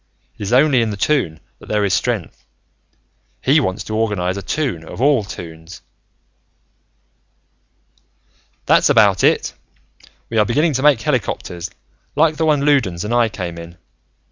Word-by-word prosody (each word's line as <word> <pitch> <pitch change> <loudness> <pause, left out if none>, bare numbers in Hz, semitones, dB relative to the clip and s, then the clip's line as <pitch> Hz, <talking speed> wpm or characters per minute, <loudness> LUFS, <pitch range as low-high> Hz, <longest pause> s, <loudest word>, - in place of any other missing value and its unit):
"It - - -11
is 100 - -3
only 130 0 +4
in 115 - 0
the 105 - -5
Toon 95 - 0 0.2
that - - -15
there 105 -1 +1
is 95 - 0
strength. 105 -4 -2 1.0
He 140 +4 +3
wants 100 -6 -2
to 110 - -5
organize 105 -5 -1
a 100 - -5
Toon 115 - -2
of 80 - -10
all 135 -3 +3
Toons." 85 -2 -10 2.8
"That's - - +4
about - - +4
it. - - +2 0.8
We 115 - +1
are 105 - +4
beginning 150 +7 +1
to 130 - -1
make 145 -5 +4
helicopters, 90 -3 -3 0.5
like 155 +1 +2
the 160 - +1
one 145 -2 +2
Loudons 115 -12 +1
and 110 - -2
I 120 -2 +3
came 85 -5 -6
in. 85 +1 -11
110 Hz, 150 wpm, -19 LUFS, 90-140 Hz, 2.8 s, only